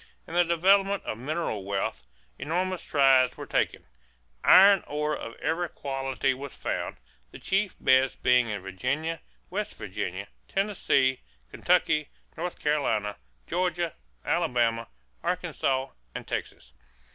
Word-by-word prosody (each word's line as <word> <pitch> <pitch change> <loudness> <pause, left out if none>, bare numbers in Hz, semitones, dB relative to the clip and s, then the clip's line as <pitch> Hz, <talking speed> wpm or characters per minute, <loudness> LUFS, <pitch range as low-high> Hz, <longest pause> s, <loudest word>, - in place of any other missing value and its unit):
In - - -10
the 175 0 +5
development 195 +4 +3
of 110 - -4
mineral 140 - -2
wealth, 95 -10 -3 0.3
enormous 180 +4 -1
strides 135 -3 +4
were - - -6
taken. - - -1 0.6
Iron 195 +1 +8
ore 150 +1 -1
of 115 -4 -7
every 170 +1 -1
quality 135 -1 -1
was 135 +1 -8
found, - - -3 0.3
the - - -11
chief 195 0 0
beds 130 0 +4
being 125 -2 +3
in 100 -3 -4
Virginia, 140 - -2 0.3
West - - -3
Virginia, - - -4 0.2
Tennessee, 140 -10 +1 0.3
Kentucky, 150 -1 +2 0.3
North 175 +2 -4
Carolina, 115 -9 0 0.3
Georgia, 175 -1 -1 0.3
Alabama, 115 -2 +1 0.3
Arkansas, 135 0 -1 0.3
and - - -6
Texas. 60 0 -5
140 Hz, 120 wpm, -27 LUFS, 125-175 Hz, 0.6 s, Iron